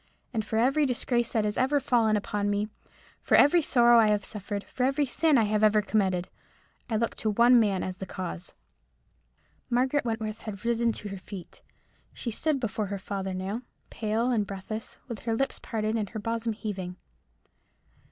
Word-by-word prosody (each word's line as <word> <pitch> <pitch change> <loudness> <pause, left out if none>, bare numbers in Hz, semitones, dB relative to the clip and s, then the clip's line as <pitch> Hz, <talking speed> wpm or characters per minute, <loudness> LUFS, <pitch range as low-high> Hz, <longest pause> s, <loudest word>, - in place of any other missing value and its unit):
And 220 -2 0
for 220 +1 -2
every 275 +6 +3
disgrace 240 -1 0
that 220 -2 +2
has 210 +1 +1
ever 275 +3 +3
fallen 230 -5 +2
upon 205 0 -2
me—for 205 +1 -3
every 335 +5 +6
sorrow 240 -5 +5
I 220 - +5
have 210 -1 +2
ever - - -11
suffered—for 205 +3 -5
every 275 +3 +2
sin 295 +3 +3
I 230 - +4
have 210 0 +1
ever 215 0 +5
committed—I 195 +2 -3
look 230 +1 0
to 220 - 0
one 235 +3 +6
man 200 -4 +1
as 185 0 -4
the 190 - -5
cause." 180 -2 -6 1.1
Margaret 260 +4 +2
Wentworth 225 -2 -3
had 210 0 -8
risen 235 0 +2
to 210 - -7
her 195 -1 -6
feet. 185 -1 -10 0.5
She 235 - -3
stood 300 +5 0
before 220 -3 -2
her 200 +1 -3
father 195 -1 -4
now, 195 +5 -3 0.3
pale 225 +3 0
and 210 -4 +1
breathless, 205 +3 -6
with 235 -4 -5
her 230 -1 -1
lips 270 +3 -1
parted, 215 -1 -2
and 215 -3 -1
her 220 - -5
bosom 230 +1 -2
heaving. 195 -5 -5
220 Hz, 175 wpm, -28 LUFS, 205-240 Hz, 1.1 s, every